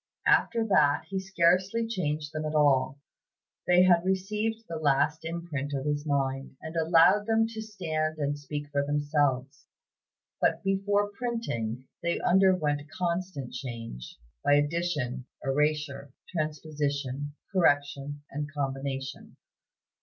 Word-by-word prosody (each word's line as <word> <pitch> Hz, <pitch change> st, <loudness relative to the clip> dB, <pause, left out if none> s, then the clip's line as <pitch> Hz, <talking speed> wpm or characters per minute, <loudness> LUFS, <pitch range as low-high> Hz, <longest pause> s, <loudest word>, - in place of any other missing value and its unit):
After 230 Hz, -1 st, +3 dB
that 150 Hz, -8 st, +3 dB
he 195 Hz, -1 st, -1 dB
scarcely 190 Hz, +4 st, +2 dB
changed 155 Hz, -8 st, -2 dB
them 155 Hz, 0 st, -3 dB
at 155 Hz, 0 st, -3 dB
all; 135 Hz, -3 st, +3 dB, 0.7 s
they 180 Hz, 0 st, +6 dB
had 175 Hz, -2 st, +5 dB
received 210 Hz, +4 st, -1 dB
the 165 Hz, -, -4 dB
last 150 Hz, +1 st, +2 dB
imprint 160 Hz, -4 st, -4 dB
of 135 Hz, +1 st, -3 dB
his 145 Hz, 0 st, -1 dB
mind, 135 Hz, -2 st, -1 dB
and 160 Hz, -, -7 dB
he 165 Hz, -, 0 dB
allowed 165 Hz, +6 st, +5 dB
them 225 Hz, 0 st, +3 dB
to 220 Hz, -1 st, -6 dB
stand 160 Hz, -7 st, -2 dB
and 145 Hz, -1 st, -1 dB
speak 145 Hz, 0 st, -5 dB
for 140 Hz, -1 st, +1 dB
themselves. 145 Hz, -1 st, 0 dB, 0.7 s
But -, -, +2 dB
before 200 Hz, +1 st, +1 dB
printing, 200 Hz, -, -3 dB, 0.2 s
they 170 Hz, 0 st, 0 dB
underwent 180 Hz, -6 st, +3 dB
constant 170 Hz, -6 st, -3 dB
change, 115 Hz, -, -7 dB, 0.3 s
by 145 Hz, -, +5 dB
addition, 145 Hz, -4 st, -1 dB, 0.2 s
erasure, 145 Hz, 0 st, 0 dB, 0.2 s
transposition, 145 Hz, -3 st, -3 dB, 0.2 s
correction, 145 Hz, -4 st, +1 dB
and 145 Hz, +1 st, -4 dB
combination. 135 Hz, -1 st, -4 dB
150 Hz, 125 wpm, -28 LUFS, 140-180 Hz, 0.7 s, they